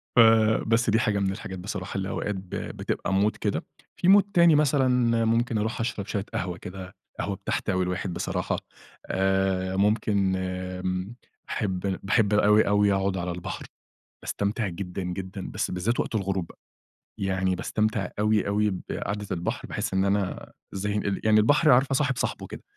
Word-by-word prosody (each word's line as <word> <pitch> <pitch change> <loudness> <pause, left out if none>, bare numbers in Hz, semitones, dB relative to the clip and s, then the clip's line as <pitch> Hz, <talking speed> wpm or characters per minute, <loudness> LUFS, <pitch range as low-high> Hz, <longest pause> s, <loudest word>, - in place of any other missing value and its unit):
ف - - +6 0.5
بس 115 0 +2
دي 110 - +3
حاجة 105 -3 +1
من 95 -1 +1
الحاجات 95 -1 -6
بصراحة 95 0 -5
اللي 95 0 -2
أوقات 105 0 -2
ب 95 -1 -8
بتبقى 95 - -3
مود 100 +3 +2
كده، - - -2 0.3
في - - -1
مود 200 +1 +8
تاني 170 -3 +6
مثلًا 145 -3 +3 0.4
ممكن 115 0 +1
أروح 110 +2 -2
أشرب 115 -4 -2
شوية 100 -2 -2
قهوة 90 -1 -2
كده 90 +1 -9 0.2
قهوة - - -2
بتحتوي 95 -1 -1
الواحد 90 0 -2
بصراحة - - -2 0.5
آآ، 95 -1 +1
ممكن 100 -1 +2
امم 90 +2 -3 0.3
باحب 95 -4 -2 0.2
باحب 100 +1 +2
أوي، 105 +1 +5
أوي 105 0 +4
أقعد 95 -1 0
على 90 0 -2
البحر 90 0 -6 0.6
باستمتع 100 +1 -1
جدًا، 90 +1 -5
جدًا، 95 +2 -5
بس - - -2
بالذات 95 +7 0
وقت - - -3
الغروب 95 -4 -1
بقى - - -17 0.6
يعني 95 -1 0
باستمتع 105 0 -1
أوي، 105 -1 +2
أوي 105 +1 +2 0.2
بقعدة 105 +1 -3
البحر 85 0 -3
باحس - - -3
إن 95 0 +2
أنا 100 -1 -1 0.2
إزاي 100 +1 -2
إن 100 -2 -1
يعني 110 0 +5
البحر 145 +8 +4
عارفة 130 +2 +4
صاحب 135 -1 +1
صاحبه - - -2
كده - - -9
100 Hz, 165 wpm, -26 LUFS, 95-110 Hz, 0.6 s, مود